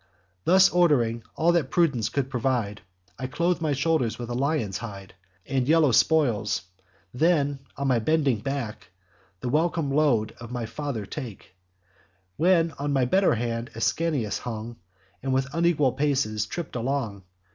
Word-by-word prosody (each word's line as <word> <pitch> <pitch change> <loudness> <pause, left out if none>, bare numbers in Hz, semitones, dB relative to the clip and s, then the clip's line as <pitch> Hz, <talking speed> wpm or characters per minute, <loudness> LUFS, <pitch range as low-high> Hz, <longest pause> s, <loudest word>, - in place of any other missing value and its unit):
Thus, 190 +2 +7
ord'ring 130 -10 +3
all 165 +2 +3
that 165 -6 +1
prudence 145 -11 +2
could 135 -2 -2
provide, 120 -5 -1 0.4
I 130 - -3
clothe 170 +6 0
my 155 -3 +1
shoulders 140 -4 0
with 120 0 -6
a - - -1
lion's 130 -7 -1
hide 100 -4 -8 0.3
And 130 -2 -1
yellow 155 -3 +4
spoils; 120 -8 +2 0.5
then, 145 -1 +2 0.2
on 140 - -1
my 125 -2 +3
bending 140 -1 +1
back, 120 -4 -4 0.5
The 125 - -2
welcome 160 +1 +1
load 135 -7 +2
of 115 - -8
my 125 -1 -3
dear 115 - -6
father 140 -8 -3
take; 115 -5 -8 0.8
While 170 - +3
on 145 +1 -1
my 135 -2 +3
better 190 +3 +3
hand 115 +1 -3
Ascanius 130 -1 0
hung, 115 0 -6 0.4
And 135 0 -1
with 135 +1 -1
unequal 165 -5 +2
paces 130 -8 0
tripp'd 170 +1 -6
along. 120 -5 -2
135 Hz, 150 wpm, -26 LUFS, 115-155 Hz, 0.8 s, Thus